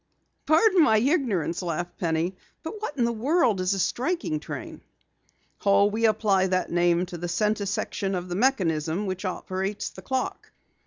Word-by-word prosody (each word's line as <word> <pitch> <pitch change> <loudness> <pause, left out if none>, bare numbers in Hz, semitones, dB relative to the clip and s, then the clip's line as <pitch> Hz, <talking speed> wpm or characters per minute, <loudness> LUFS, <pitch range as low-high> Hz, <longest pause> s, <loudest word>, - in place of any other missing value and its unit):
"Pardon 355 +4 +5
my 220 -8 +5
ignorance," 215 - +1
laughed 175 0 -4
Penny, 170 +2 0 0.3
"but 415 +7 -6
what 365 -9 -4
in 240 - +2
the 235 - +1
world 235 - +2
is 185 +2 +1
the - - -2
striking 310 - -1
train?" - - -7 0.8
"Oh, 200 0 +5
we 220 +3 +1
apply 200 -3 +2
that 185 0 -1
name 175 +1 +2
to 175 -1 -8
the 175 - -3
center 210 +3 0
section 195 0 -2
of 180 0 -4
the 175 - -4
mechanism 180 - +1
which 185 +1 -4
operates 190 +2 -3
the 190 - -11
clock. 260 +7 -3
200 Hz, 165 wpm, -26 LUFS, 180-245 Hz, 0.8 s, Pardon